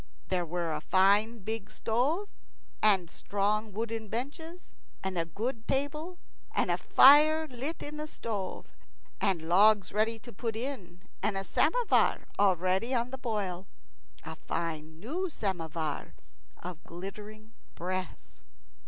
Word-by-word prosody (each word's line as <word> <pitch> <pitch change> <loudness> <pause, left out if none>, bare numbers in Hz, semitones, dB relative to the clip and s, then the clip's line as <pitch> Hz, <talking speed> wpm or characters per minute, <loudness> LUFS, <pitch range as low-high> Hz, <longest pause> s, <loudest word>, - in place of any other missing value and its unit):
There 180 -2 0
were 170 0 -2
a 150 - -3
fine 200 +5 +3
big 220 0 -3
stove, 265 - 0 0.5
and 195 -5 +4
strong 205 +4 -1
wooden 225 +1 -3
benches, 310 - -6 0.3
and 190 -1 -2
a 165 -1 0
good 225 - -4
table, 300 +6 -1 0.4
and - - +2
a - - +2
fire 305 +3 +7
lit 270 +5 -5
in 300 +1 -6
the 305 0 -4
stove, 205 -9 -4 0.5
and 185 -5 +1
logs 200 +2 +5
ready 220 +2 +1
to 240 +2 -12
put 225 +2 -3
in, 220 -8 -5 0.2
and 200 -1 0
a 195 - -2
samovar - - +2
already 190 +5 +2
on 240 +1 0
the 265 - -6
boil 200 -6 -2 0.6
a - - -7
fine 160 -1 -4
new 335 - -2
samovar 165 - -3 0.4
of 170 -2 -8
glittering 210 +5 -9 0.2
brass. 185 +1 -5
215 Hz, 130 wpm, -30 LUFS, 185-250 Hz, 0.6 s, fire